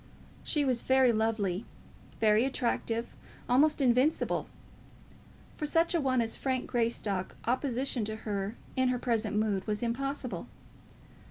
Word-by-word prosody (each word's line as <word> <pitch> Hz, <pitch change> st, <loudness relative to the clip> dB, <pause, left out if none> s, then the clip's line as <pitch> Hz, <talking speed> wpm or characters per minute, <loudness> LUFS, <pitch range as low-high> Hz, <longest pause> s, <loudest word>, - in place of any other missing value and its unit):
She 295 Hz, -2 st, +1 dB
was 255 Hz, -3 st, +1 dB
very 260 Hz, -1 st, +4 dB
lovely, 215 Hz, -3 st, 0 dB, 0.6 s
very 215 Hz, +1 st, +4 dB
attractive, 235 Hz, -3 st, -1 dB, 0.3 s
almost 295 Hz, +5 st, +4 dB
invincible. 255 Hz, +4 st, +2 dB, 1.1 s
For 300 Hz, -, -1 dB
such 330 Hz, +3 st, +3 dB
a 340 Hz, -, +2 dB
one 260 Hz, -3 st, +2 dB
as 225 Hz, -1 st, -1 dB
Frank 260 Hz, -2 st, -1 dB
Greystock 220 Hz, -5 st, -1 dB
opposition 255 Hz, 0 st, 0 dB
to 215 Hz, +1 st, -4 dB
her 205 Hz, -1 st, -3 dB, 0.2 s
in 260 Hz, 0 st, +2 dB
her 250 Hz, 0 st, +1 dB
present 230 Hz, -4 st, -1 dB
mood 210 Hz, -2 st, 0 dB
was 210 Hz, +2 st, -1 dB
impossible. 265 Hz, +2 st, -3 dB
240 Hz, 125 wpm, -30 LUFS, 220-265 Hz, 1.1 s, very